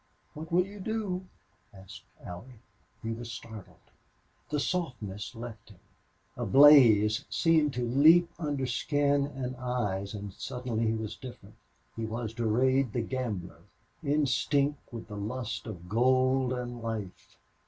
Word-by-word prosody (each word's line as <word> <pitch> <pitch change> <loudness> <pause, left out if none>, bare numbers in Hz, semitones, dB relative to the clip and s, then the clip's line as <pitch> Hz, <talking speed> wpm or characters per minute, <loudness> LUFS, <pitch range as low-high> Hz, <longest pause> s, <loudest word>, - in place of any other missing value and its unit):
"What 155 +2 -8
will 180 +2 +3
you 200 +1 -11
do?" 195 -3 -3 0.4
asked 95 -1 -13
Allie. 110 +7 -10 0.4
He 115 - -2
was 115 +1 -6
startled. 115 -3 -11 0.6
The 150 - -1
softness 125 - -3
left 115 -2 -9
him. 100 - -16 0.6
A - - -4
blaze 120 -7 +7
seemed 155 -4 +2
to 120 -1 -1
leap 160 +8 +6
under 145 -4 -1
skin 140 +2 +1
and 130 -3 -5
eyes, 110 -6 -2
and 100 -1 -7
suddenly 120 -1 -3
he 110 - +1
was 110 -1 -4
different 130 -3 -11 0.4
he 115 - -3
was 110 0 -4
Durade 125 +2 +1
the 120 - 0
gambler, 115 -8 -4 0.4
instinct 145 0 +1
with 115 -2 -8
the 105 -1 -8
lust 115 +3 -4
of 90 -5 -8
gold 130 +3 +2
and 120 -1 -4
life. 110 -5 -6
125 Hz, 135 wpm, -29 LUFS, 110-140 Hz, 0.6 s, blaze